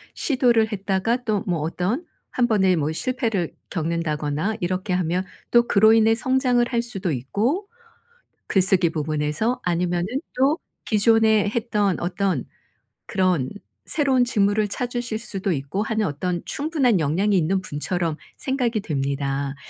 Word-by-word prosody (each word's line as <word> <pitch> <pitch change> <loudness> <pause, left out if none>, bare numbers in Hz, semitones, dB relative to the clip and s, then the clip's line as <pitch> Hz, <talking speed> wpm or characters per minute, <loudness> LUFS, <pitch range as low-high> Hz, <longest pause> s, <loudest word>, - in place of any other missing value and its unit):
시도를 240 -5 +2
했다가 200 +4 -1
또 210 -4 0
뭐 175 -5 -1
어떤 180 - -2 0.3
1 245 -1 +2
번의 190 -5 +3
뭐 150 0 0
실패를 225 - -1 0.2
겪는다거나 160 +2 -1
이렇게 185 0 -2
하면 180 0 0 0.3
또 240 0 +5
그로 220 +2 +5
인해 225 0 +4
성장을 250 0 +2
할 235 -1 0
수도 195 -7 -3
있고 210 - -1 0.8
글쓰기 185 -3 +3
부분에서 155 +9 -1
아니면은 175 0 0 0.3
또 275 +5 +3 0.3
기존에 220 -1 +4
했던 210 -5 0
어떤 180 -4 -1 0.6
그런 180 -9 +1 0.4
새로운 270 -5 +2
직무를 210 -2 +2
찾으실 240 +1 -3
수도 200 -3 -3
있고 140 +6 -2
하는 220 -1 0
어떤 175 +3 -2
충분한 280 - +1
역량이 180 +8 +1
있는 185 +2 +1
분처럼 165 0 -2 0.2
생각이 245 -5 -1
됩니다. 140 -3 -2
200 Hz, 285 characters per minute, -23 LUFS, 170-235 Hz, 0.8 s, 또